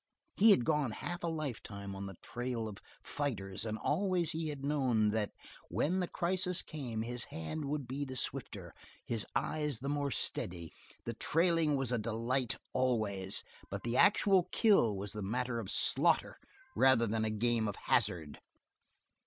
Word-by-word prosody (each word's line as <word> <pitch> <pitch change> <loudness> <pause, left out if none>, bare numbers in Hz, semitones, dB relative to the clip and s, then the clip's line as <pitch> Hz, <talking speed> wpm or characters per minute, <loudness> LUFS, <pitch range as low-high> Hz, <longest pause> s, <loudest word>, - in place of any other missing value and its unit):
He 220 +3 +6
had 125 - +6
gone 150 -4 +2
half 175 +10 -5
a - - 0
lifetime 110 -11 -4
on 100 0 -5
the 95 - -8
trail 120 -2 -3
of 105 -2 -8 0.2
fighters 105 -9 -3
and 110 -1 -2
always 180 - +1
he 160 0 -2
had 140 -2 -5
known 130 -7 +2
that 105 -1 0 0.4
when 150 - +1
the 180 - 0
crisis 180 +1 0
came 120 -8 -4
his 120 +1 -4
hand 80 - -5
would 140 -2 -3
be 135 +3 -3
the 130 -2 -6
swifter, - - -4 0.3
his 115 -3 -1
eyes 150 -4 0
the 135 +4 -4
more 145 -1 0
steady; 85 -7 -2 0.3
the 115 - -2
trailing 165 +3 +2
was 135 -3 0
a 125 - +1
delight 115 +3 -1 0.2
always, 110 -7 +1 0.3
but - - -5
the 120 +1 -1
actual 195 -3 +5
kill 120 - +4
was 100 +1 -3
a 105 - -4
matter 120 +4 -1
of 105 -4 -6
slaughter 150 - +2 0.4
rather 130 -3 +5
than 110 0 0
a 110 - +1
game 110 +1 +1
of 100 - -3
hazard. 80 -4 0
125 Hz, 165 wpm, -34 LUFS, 110-150 Hz, 0.4 s, He